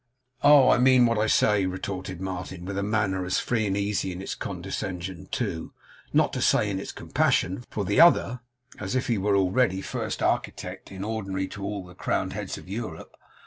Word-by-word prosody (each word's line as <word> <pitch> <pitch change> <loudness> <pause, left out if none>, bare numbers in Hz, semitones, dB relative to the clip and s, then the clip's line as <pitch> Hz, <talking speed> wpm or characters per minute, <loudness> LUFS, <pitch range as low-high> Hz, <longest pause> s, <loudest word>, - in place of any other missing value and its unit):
'Oh! 145 -3 +7
I - - +4
mean 130 -1 +6
what 115 -2 +2
I 110 - +2
say,' 105 -3 +3
retorted 95 -1 -5
Martin, 95 -1 -5
with 100 +1 -4
a 100 - -1
manner 100 -2 0
as 90 - 0
free 110 -3 0
and 100 0 0
easy 100 -1 -1
in 90 - -6
its 95 - -4
condescension 95 0 -5
to, 95 -9 -3 0.4
not - - +3
to - - -2
say - - +3
in - - -2
its - - -6
compassion 95 +7 0
for, 100 - -3
the 100 - +4
other, 125 -7 +5 0.4
as 95 +3 -3
if 130 - +1
he 115 -5 0
were 100 +1 +2
already 95 +1 +2
First - - -4
Architect - - -2
in 95 0 -6
ordinary 100 -3 -3
to 100 - -8
all 100 -1 -4
the 90 - -13
Crowned - - -1
Heads - - -4
in - - -12
Europe. 100 -4 -6
100 Hz, 195 wpm, -26 LUFS, 95-110 Hz, 0.4 s, Oh